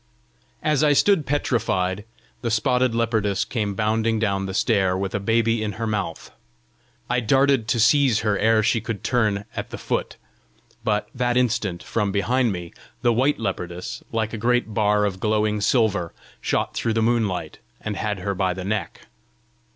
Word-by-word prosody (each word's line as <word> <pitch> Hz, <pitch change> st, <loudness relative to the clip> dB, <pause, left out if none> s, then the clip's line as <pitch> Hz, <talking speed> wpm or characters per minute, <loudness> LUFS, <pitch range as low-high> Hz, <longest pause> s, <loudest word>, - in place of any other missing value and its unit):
As 155 Hz, -1 st, +2 dB
I 150 Hz, -1 st, +5 dB
stood 175 Hz, +1 st, +3 dB
petrified, 105 Hz, -8 st, 0 dB, 0.4 s
the 120 Hz, -, -1 dB
spotted 125 Hz, +2 st, +1 dB
leopardess 110 Hz, -4 st, 0 dB
came 105 Hz, -5 st, -2 dB
bounding 110 Hz, +2 st, +1 dB
down 100 Hz, -3 st, 0 dB
the 95 Hz, -, -5 dB
stair 95 Hz, -5 st, +2 dB
with 95 Hz, 0 st, -3 dB
a 100 Hz, -, 0 dB
baby 115 Hz, +2 st, +1 dB
in 105 Hz, -1 st, -2 dB
her 115 Hz, +4 st, -4 dB
mouth. 105 Hz, -6 st, -3 dB, 0.8 s
I 125 Hz, +1 st, +1 dB
darted 135 Hz, 0 st, +3 dB
to 120 Hz, -, +1 dB
seize 125 Hz, 0 st, +4 dB
her 105 Hz, -2 st, +1 dB
ere 110 Hz, 0 st, +3 dB
she 115 Hz, +1 st, +2 dB
could 115 Hz, -2 st, -5 dB
turn 105 Hz, -5 st, +1 dB
at -, -, -4 dB
the -, -, -6 dB
foot; -, -, -3 dB, 0.7 s
but 105 Hz, -3 st, 0 dB
that 125 Hz, -1 st, 0 dB
instant, 105 Hz, -8 st, 0 dB
from 105 Hz, -3 st, -1 dB
behind 120 Hz, +4 st, +1 dB
me, 90 Hz, -2 st, -6 dB, 0.3 s
the 120 Hz, -1 st, +4 dB
white 130 Hz, +5 st, +2 dB
leopardess, 90 Hz, 0 st, -4 dB
like 110 Hz, 0 st, -1 dB
a 115 Hz, -, -4 dB
great 120 Hz, -2 st, +1 dB
bar 105 Hz, -1 st, +2 dB
of 95 Hz, -2 st, -3 dB
glowing 105 Hz, 0 st, +1 dB
silver, 100 Hz, -6 st, +1 dB, 0.3 s
shot -, -, -1 dB
through 115 Hz, -, -1 dB
the 115 Hz, 0 st, +1 dB
moonlight, 105 Hz, -9 st, 0 dB, 0.2 s
and 110 Hz, -1 st, -4 dB
had 105 Hz, 0 st, -2 dB
her 100 Hz, +2 st, -1 dB
by 95 Hz, -1 st, 0 dB
the 95 Hz, -1 st, -6 dB
neck. 105 Hz, 0 st, -3 dB
110 Hz, 170 wpm, -23 LUFS, 100-120 Hz, 0.8 s, I